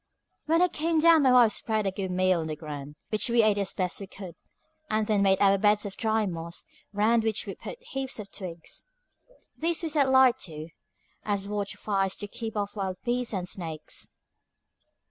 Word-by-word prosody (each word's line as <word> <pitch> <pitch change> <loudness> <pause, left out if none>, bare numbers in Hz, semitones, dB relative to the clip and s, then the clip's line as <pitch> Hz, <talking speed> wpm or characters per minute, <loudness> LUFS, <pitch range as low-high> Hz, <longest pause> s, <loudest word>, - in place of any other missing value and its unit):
When 330 +3 +4
I - - +5
came 325 -1 0
down 330 0 +6
my 265 -2 +5
wife 245 -3 +6
spread 215 0 -1
a 195 - +1
good 190 0 -4
meal 185 -1 +2
on 160 - -3
the 155 - -3
ground, 150 -2 -8
which 215 +3 +1
we 235 -1 +4
ate 210 -1 +3
as 195 -1 -1
best 180 -2 -1
we 195 - -7
could, 185 -2 -9 0.6
and 215 0 +1
then 210 -2 +2
made 195 -1 +4
our 195 -1 +4
beds 210 +1 +3
of 200 - -6
dry 220 -1 +1
moss, 170 -2 -5 0.3
round 215 +3 +3
which 220 -1 -1
we - - -5
put - - -8
heaps 270 - -4
of 210 -2 -8
twigs. 175 - -6 0.7
These 335 +1 0
we 325 - -1
set 285 -3 +3
light 260 -2 +5
to, 155 -2 -8 0.5
as 200 -2 -1
watch 205 -1 -3
fires 195 -2 0
to 205 - -5
keep 220 +1 -6
off 205 0 -2
wild 190 -2 -3
beasts 245 0 -1
and 180 -1 -3
snakes. 160 -5 -5
205 Hz, 200 wpm, -27 LUFS, 185-235 Hz, 0.7 s, down